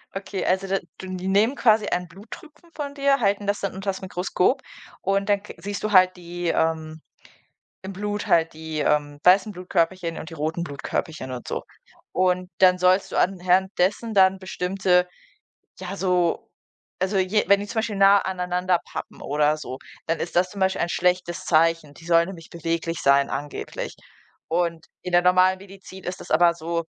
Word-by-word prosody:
Okay, 195 0 -4
also 190 +1 +1
da 195 0 0 0.2
du 190 - -8
die 185 +1 -5
nehmen 210 +7 +3
quasi 220 -5 +3
einen 180 0 -1
Bluttropfen 300 - -13
von 285 -1 -5
dir, 275 0 +2
halten 200 -1 +1
das 205 +1 0
dann 195 - -3
unters 195 0 -3
Mikroskop 185 +5 0 0.4
und 195 +1 0
dann 200 0 +2
k - - -10
siehst 200 +3 -5
du 215 - -1
halt 185 -1 +6
die, 175 0 -6
ähm 160 -1 -1 0.8
im 195 - -5
Blut 205 +2 -4
halt 165 -1 +3
die, 160 0 -6
ähm, 145 -1 0
weißen 190 +3 +5
Blutkörperchen 180 -2 -1
und 160 - -8
die 165 - -8
roten 160 +3 -2
Blutkörperchen 145 -2 -4
und 125 - -7
so. - - -3 0.5
Und 180 0 +1
dann 180 -1 +5
sollst 185 +2 +3
du - - -4
anhand 185 +1 +2
dessen 205 +5 0
dann 190 -1 +5
bestimmte, 180 -1 +1 0.7
ja, 190 +1 -5
so 180 -3 0 0.5
also 190 +2 0
je 190 +3 +1
wenn 200 0 +5
die 205 - -6
zum 220 - -2
Beispiel 220 -2 -2
nahe 195 0 +5
aneinander 180 -1 0
pappen - - -7
oder 150 +1 +1
so, 130 -3 -7 0.3
dann 165 0 0
ist 170 - -5
das 180 +1 +3
zum 200 - -9
Beispiel 190 0 +1
ein 170 - 0
schlechtes 180 0 0
Zeichen. 165 -2 +2
Die 165 - -15
sollen 170 0 +4
nämlich 170 -4 -10
beweglich 165 0 -3
sein 140 0 +4
angeblich. 145 +1 -5 0.5
Und 170 -1 -1 0.2
in 180 - -5
der 175 - +6
normalen 185 +1 +4
Medizin 195 -1 -12
ist 180 +1 -5
das - - -11
aber 170 +2 +5
so 170 0 -3
180 Hz, 180 wpm, -24 LUFS, 170-195 Hz, 0.8 s, halt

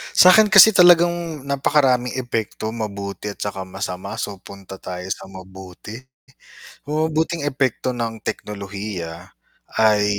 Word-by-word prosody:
Sakin 210 +4 +7
kasi 215 +2 +9
talagang 175 -4 +4
napakaraming 135 -3 +1
epekto 115 -3 -3
mabuti 100 -1 -6
at - - -13
tsaka 100 -2 -4
masama, 95 0 -5
so - - -3 0.2
punta 100 -1 -11
tayo 90 0 -6
sa - - -12
mabuti. 95 +2 -11 0.9
Uh, 155 +1 0
mabuting 160 0 -1
epekto 130 -2 -1
ng 115 -1 -2
teknolohiya 100 -4 -5 0.7
ay 105 -1 +3
110 Hz, 120 wpm, -21 LUFS, 100-150 Hz, 0.9 s, kasi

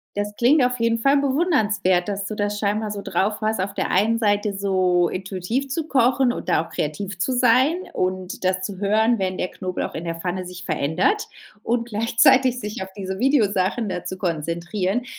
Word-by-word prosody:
das 205 0 -3
klingt 260 +3 +4
auf 250 -1 -1
jeden 230 0 +2
Fall 275 +4 +4
bewundernswert, 260 - +1
dass 200 0 -3
du 215 - -4
das 205 0 -1
scheinbar 210 +1 -1
so 200 -1 -5
drauf 210 +2 -1
hast, 215 -3 0
auf 195 +1 -3
der - - -1
einen 220 +5 +3
Seite 205 -1 +1
so 185 -3 +2
intuitiv 195 +8 -3
zu 315 +3 -3
kochen 255 -1 +3
und - - -6
da 165 - +2
auch 165 - -16
kreativ 185 +7 -4
zu 255 +6 0
sein 255 +6 +4 0.2
und 185 0 -3
das 185 0 +1
zu 190 -1 -5
hören, 220 +3 +2
wenn 185 -1 -1
der 180 - -2
Knoblauch 185 -1 -4
in 165 +2 -5
der 165 0 -3
Pfanne 180 +2 -3
sich 180 0 -9
verändert 165 - 0 0.4
und 235 0 -1
gleichzeitig 250 +3 +3
sich 210 -1 -5
auf 190 - -9
diese 190 0 -4
Videosachen 215 -5 +1
da 180 -1 -4
zu 185 - -5
konzentrieren. 175 +5 -2
205 Hz, 190 wpm, -22 LUFS, 185-240 Hz, 0.4 s, klingt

